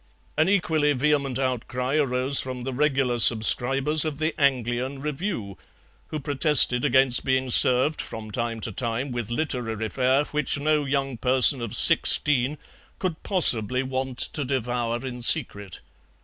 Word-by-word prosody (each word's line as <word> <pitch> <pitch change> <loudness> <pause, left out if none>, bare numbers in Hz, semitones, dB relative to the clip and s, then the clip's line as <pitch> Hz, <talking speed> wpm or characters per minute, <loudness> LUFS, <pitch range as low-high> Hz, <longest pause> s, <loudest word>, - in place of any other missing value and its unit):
An 155 +4 +1
equally 160 -7 +1
vehement 140 -1 -1
outcry 125 0 -3
arose 135 -2 +1
from 130 -1 -7
the 135 +1 -5
regular 135 -3 0
subscribers 130 +7 +4
of 155 -3 -4
the 155 +1 -2
ANGLIAN 130 0 -1
REVIEW 140 - -5 0.5
who 155 - -6
protested 140 -3 +2
against 130 -3 +2
being 130 -1 -1
served 130 +6 +4
from 110 -1 -9
time 115 0 -4
to 110 - -1
time 120 +5 -4
with 120 -3 -5
literary 120 -5 -3
fare 130 +2 +1
which 150 -1 -2
no 150 0 0
young 135 -2 -2
person 130 +1 +3
of 115 -3 -5
sixteen 145 0 +2 0.4
could 175 -4 -4
possibly 125 - +3
want 130 -1 -5
to 145 - 0
devour 125 -2 -3
in 125 -2 -7
secret. 100 - -1
130 Hz, 140 wpm, -23 LUFS, 120-145 Hz, 0.5 s, subscribers